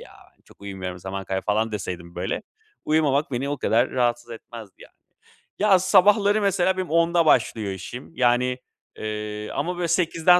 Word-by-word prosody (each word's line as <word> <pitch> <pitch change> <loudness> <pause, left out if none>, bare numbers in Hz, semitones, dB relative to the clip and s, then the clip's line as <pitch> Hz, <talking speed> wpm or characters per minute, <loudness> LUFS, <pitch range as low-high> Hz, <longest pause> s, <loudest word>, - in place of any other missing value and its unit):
ya, - - -13 0.2
ben - - -35
çok - - -21
uyumuyorum, 95 -2 -6
zaman 95 +2 -6
kaybı." 95 0 -3
falan 110 +2 0
deseydim 90 -4 -5
böyle, 90 - -3 0.4
uyumamak 150 -2 +2
beni 130 +3 -2
o 145 0 -2
kadar 120 +3 +2
rahatsız 120 -1 0
etmezdi 115 -3 -10
yani. - - -16 0.7
Ya, 200 -2 +5
sabahları 200 +3 +4
mesela 190 -2 +2
benim 185 -1 -3
10'da 170 +1 +3
başlıyor 110 -8 +2
işim. 95 - -8
Yani, 125 0 +2 0.4
eee, 105 0 -5
ama, 175 +5 -2
böyle, 175 -1 -1
8'den 170 +1 +4
125 Hz, 160 wpm, -24 LUFS, 105-175 Hz, 0.7 s, Ya